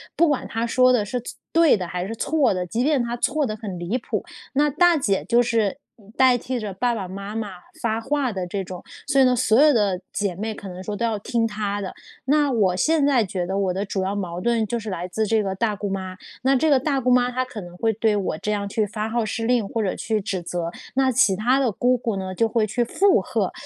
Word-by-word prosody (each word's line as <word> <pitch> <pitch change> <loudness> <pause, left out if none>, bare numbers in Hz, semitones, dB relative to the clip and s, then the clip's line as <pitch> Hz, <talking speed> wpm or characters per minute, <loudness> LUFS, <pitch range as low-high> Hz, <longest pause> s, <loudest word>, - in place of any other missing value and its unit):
不 340 - +4
管 285 - -1
她 225 +1 -2
说 255 +1 +4
的 220 -4 +3
是 250 +4 -3
错 - - -8 0.2
对 330 -5 +6
的， 180 - -4
还 180 +2 -3
是 225 - -5
错 290 +1 +2
的， 180 -1 -2
即 225 +7 -1
便 290 -5 +2
她 235 0 -3
错 300 +3 +1
得 215 -2 -3
很 200 -5 -6
离 175 +8 -2
谱， - - -3 0.3
那 295 +2 +3
大 350 +3 +4
姐 200 -8 0
就 240 0 +3
是 225 0 0 0.4
代 260 -1 +6
替 245 +1 -3
着 205 -3 -5
爸 240 +4 0
爸 195 -4 -4
妈 200 +3 -7
妈 215 -2 -3 0.3
发 225 -1 -1
话 275 -1 0
的 185 -3 -4
这 195 +1 -3
种， 180 -1 -8 0.2
所 275 -2 +3
以 - - +7
呢， 250 -1 +4
所 235 +1 +4
有 305 -1 +7
的 200 -7 +1
姐 200 -3 -1
妹 220 +4 -3
可 200 - -9
能 185 0 -8
说 205 +2 -4
都 235 - -1
要 220 -3 -1
听 230 +2 0
她 205 -2 -2
的。 190 - -5 0.3
那 290 0 +3
我 195 -6 +2
现 310 - +2
在 260 -6 +4
觉 185 -2 -3
得 190 +2 -3
我 195 -2 +1
的 195 +3 -2
主 195 0 -2
要 195 +2 -1
矛 180 -3 -4
盾 235 -2 +1
就 235 +2 -2
是 215 -1 -6
来 180 -1 -4
自 215 +4 -1
这 220 -1 +2
个 190 -1 -2
大 210 +1 0
姑 205 +1 -4
妈， 190 -1 -4 0.2
那 270 +2 +3
这 315 +5 +2
个 270 - +5
大 275 0 0
姑 250 0 +1
妈 250 0 +4
她 255 +1 -1
可 230 -6 -8
能 175 0 -11
会 225 +2 +1
对 220 0 +1
我 195 -5 -1
这 210 - -2
样 200 -1 -1
去 210 +1 0
发 215 +2 -3
号 230 0 0
施 225 +1 -3
令 240 -3 +2
或 225 -2 -1
者 190 - -1
去 220 -1 -1
指 190 -2 -3
责， 170 0 -3 0.2
那 265 -1 +3
其 235 -6 +4
他 250 +6 +2
的 250 -5 +2
姑 250 +5 +2
姑 225 -3 -2
呢 190 0 -4
就 225 +4 +2
会 220 -1 +1
去 240 +3 0
附 385 +11 +3
和， - - -1
220 Hz, 280 characters per minute, -23 LUFS, 195-250 Hz, 0.4 s, 以